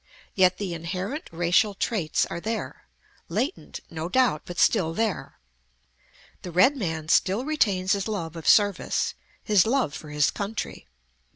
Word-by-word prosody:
Yet 185 Hz, -1 st, +4 dB
the 195 Hz, -4 st, -3 dB
inherent 185 Hz, -, -4 dB
racial 175 Hz, +5 st, +2 dB
traits 190 Hz, -7 st, 0 dB
are -, -, -5 dB
there: 220 Hz, +5 st, -5 dB, 0.4 s
latent, 245 Hz, -, -3 dB
no 165 Hz, +1 st, -4 dB
doubt, 245 Hz, -, +2 dB
but 175 Hz, -, -8 dB
still 165 Hz, -1 st, +2 dB
there. 220 Hz, -5 st, -2 dB, 1.0 s
The 180 Hz, -, -7 dB
red 185 Hz, -, +4 dB
man 160 Hz, -, -3 dB
still 195 Hz, +8 st, +2 dB
retains 200 Hz, -12 st, +1 dB
his 200 Hz, 0 st, +1 dB
love 170 Hz, -7 st, -4 dB
of 165 Hz, -, -1 dB
service; 205 Hz, -2 st, +3 dB, 0.3 s
his 210 Hz, -2 st, +4 dB
love 250 Hz, -, +1 dB
for 155 Hz, -, -8 dB
his 150 Hz, -2 st, +2 dB
country. 200 Hz, -, -5 dB
190 Hz, 145 wpm, -25 LUFS, 170-220 Hz, 1.0 s, Yet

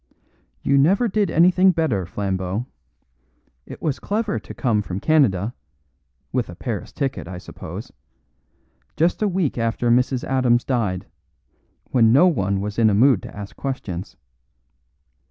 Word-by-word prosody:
"You 140 Hz, 0 st, +3 dB
never 195 Hz, -, +3 dB
did 205 Hz, -2 st, 0 dB
anything 180 Hz, +3 st, +4 dB
better, 120 Hz, -, 0 dB
Flambeau. 95 Hz, +3 st, -2 dB, 1.0 s
It -, -, -10 dB
was 150 Hz, -5 st, -1 dB
clever 210 Hz, 0 st, -1 dB
to -, -, -10 dB
come 115 Hz, -6 st, +1 dB
from 95 Hz, -2 st, -5 dB
Canada 120 Hz, -, +2 dB, 0.8 s
(with 125 Hz, -5 st, -1 dB
a 85 Hz, -, -8 dB
Paris 110 Hz, 0 st, -5 dB
ticket, 135 Hz, -, -3 dB
I 90 Hz, 0 st, -7 dB
suppose) 90 Hz, -, -9 dB, 1.1 s
just 170 Hz, +6 st, +1 dB
a 210 Hz, -, +3 dB
week 180 Hz, -9 st, -1 dB
after 115 Hz, +1 st, 0 dB
Mrs. 125 Hz, +1 st, +2 dB
Adams 125 Hz, -2 st, +2 dB
died, 105 Hz, -8 st, -1 dB, 0.9 s
when 115 Hz, -3 st, +4 dB
no 140 Hz, +9 st, +6 dB
one 100 Hz, -, +1 dB
was 105 Hz, +2 st, -4 dB
in 110 Hz, -1 st, +5 dB
a 100 Hz, -, +2 dB
mood 120 Hz, -1 st, +4 dB
to -, -, -10 dB
ask 100 Hz, -1 st, -8 dB
questions. 100 Hz, -10 st, -5 dB
120 Hz, 140 wpm, -22 LUFS, 100-155 Hz, 1.1 s, no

